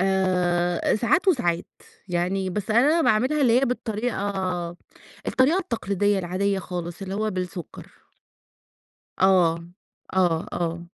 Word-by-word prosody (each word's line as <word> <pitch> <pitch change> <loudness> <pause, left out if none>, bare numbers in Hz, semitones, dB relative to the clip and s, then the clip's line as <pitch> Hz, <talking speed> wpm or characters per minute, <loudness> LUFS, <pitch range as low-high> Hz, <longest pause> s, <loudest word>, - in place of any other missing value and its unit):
آآ، 180 -2 +1
ساعات 245 - +2
وساعات 175 - +1 0.4
يعني 185 +2 -1
بس 205 +3 -4
أنا 285 +9 +4
باعملها 255 +6 +2
اللي 250 -1 +4
هي - - +3
بالطريقة 220 -4 -2 1.0
الطريقة 285 +8 +3
التقليدية 205 - 0
العادية 190 +2 -1
خالص 175 -1 -6
اللي 190 0 -4
هو 215 +1 -1
بالسُكّر. 180 -2 -6 1.3
آه، 175 -3 +4 0.5
آه، 175 -3 +2
آه، 170 0 -3
190 Hz, 110 wpm, -24 LUFS, 175-225 Hz, 1.3 s, أنا